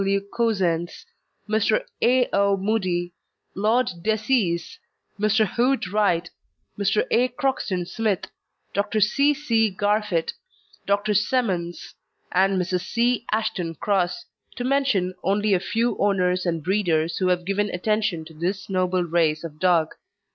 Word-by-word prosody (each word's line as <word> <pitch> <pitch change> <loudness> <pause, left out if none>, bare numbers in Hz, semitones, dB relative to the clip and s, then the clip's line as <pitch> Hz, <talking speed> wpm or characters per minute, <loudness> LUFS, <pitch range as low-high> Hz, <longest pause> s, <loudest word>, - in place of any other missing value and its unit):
W. 195 0 +1 0.2
Cousens, 185 -8 0 0.4
Mr. 215 0 +1 0.2
A. 250 +1 +4
O. 200 0 +3
Mudie, 185 -4 -1 0.4
Lord 220 +6 +2 0.2
Decies, 215 -4 0 0.4
Mr. 215 +1 +3
Hood 245 +1 0
Wright, 180 -4 +1 0.5
Mr. 200 +1 +1
A. 245 +2 +4
Croxton 250 -8 -2
Smith, 205 +1 -1 0.5
Dr. 205 +2 0
C. 280 +8 +3
C. 230 -7 +1
Garfit, 205 -3 0 0.5
Dr. 205 +1 +1
Semmence, 200 -6 -1 0.4
and 190 +1 +2
Mrs. 180 0 -1
C. 235 +1 0
Ashton 190 -6 -1
Cross, 190 +4 -1 0.3
to 245 - -4
mention 255 -9 +1
only 205 +2 +1
a 185 - +3
few 230 +4 0
owners 185 -2 +1
and 165 -3 -1
breeders 170 -4 0
who 185 - +1
have 180 -1 +1
given 200 +2 0
attention 205 -3 -1
to 160 - -13
this 185 +5 -3
noble 185 -1 +1
race 165 -2 +1
of 155 -2 -8
dog. 170 -3 +2
200 Hz, 130 wpm, -24 LUFS, 180-220 Hz, 0.5 s, A